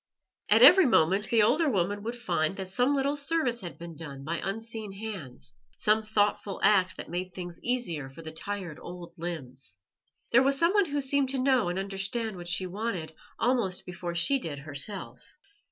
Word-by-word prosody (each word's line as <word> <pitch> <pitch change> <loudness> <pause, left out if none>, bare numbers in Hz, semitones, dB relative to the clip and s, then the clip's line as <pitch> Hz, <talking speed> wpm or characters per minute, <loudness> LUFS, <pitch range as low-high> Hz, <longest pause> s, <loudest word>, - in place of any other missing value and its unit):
At 220 +3 +6
every 350 +4 +9
moment 195 0 +3
the 225 -2 +4
older 295 +8 +3
woman 205 -2 0
would 230 +3 -4
find 175 -6 -1
that 190 -1 -6
some 250 +6 +2
little 280 +1 +1
service 285 -5 0
had 175 - -7
been 170 -1 -9
done 145 -4 -7
by 165 +4 -3
unseen 220 +1 -5
hands, 195 - -7 0.2
some 215 +1 +4
little 215 0 -13
thoughtful 205 -2 +1
act 190 -3 +4
that - - -6
made 180 +1 -3
things 175 -2 -7
easier 200 - -1
for 140 +5 -12
the 160 - -6
tired 180 -1 -5
old 175 -1 -9
limbs. 135 - -6 0.5
There 240 - +6
was 275 +1 +2
someone 370 +6 +4
who 290 -3 -2
seemed 270 0 +1
to 270 - -1
know 255 -6 +2
and 175 - -3
understand 195 +3 -3
what 175 -1 -8
she 175 +2 0
wanted 185 -4 -4 0.2
almost 235 -7 0
before 175 -1 -5
she 270 +11 +3
did 155 - -5
herself. 145 +8 -3
195 Hz, 185 wpm, -28 LUFS, 170-240 Hz, 0.5 s, every